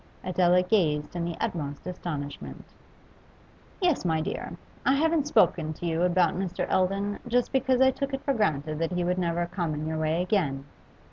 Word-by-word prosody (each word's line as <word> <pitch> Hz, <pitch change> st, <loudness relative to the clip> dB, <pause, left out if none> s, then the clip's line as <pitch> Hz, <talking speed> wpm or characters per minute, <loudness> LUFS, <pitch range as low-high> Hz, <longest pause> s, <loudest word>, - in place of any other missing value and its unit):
Adela 180 Hz, 0 st, +3 dB
gazed 165 Hz, -7 st, +1 dB
in 170 Hz, -1 st, -1 dB
the 170 Hz, -1 st, -4 dB
utmost 155 Hz, -10 st, -3 dB
astonishment. 155 Hz, -6 st, -6 dB, 1.1 s
'Yes, 355 Hz, -7 st, +2 dB
my 160 Hz, -3 st, +1 dB
dear. 155 Hz, -, -4 dB, 0.3 s
I 270 Hz, -, +4 dB
haven't 315 Hz, 0 st, +2 dB
spoken 160 Hz, -, +3 dB
to 175 Hz, -, -8 dB
you 165 Hz, 0 st, 0 dB
about 180 Hz, -1 st, +3 dB
Mr. 185 Hz, -1 st, -2 dB
Eldon, 195 Hz, +2 st, +1 dB
just 245 Hz, +1 st, +1 dB
because 260 Hz, -1 st, +2 dB
I 265 Hz, 0 st, +6 dB
took 275 Hz, +2 st, -3 dB
it 270 Hz, 0 st, -4 dB
for 275 Hz, -, +1 dB
granted 155 Hz, -, 0 dB
that 165 Hz, +2 st, -1 dB
he 180 Hz, 0 st, 0 dB
would 180 Hz, +1 st, 0 dB
never 170 Hz, -1 st, 0 dB
come 175 Hz, -3 st, -3 dB
in 150 Hz, +1 st, -4 dB
your 160 Hz, 0 st, -2 dB
way 160 Hz, +2 st, +1 dB
again. 150 Hz, -9 st, 0 dB
180 Hz, 180 wpm, -27 LUFS, 160-210 Hz, 1.1 s, I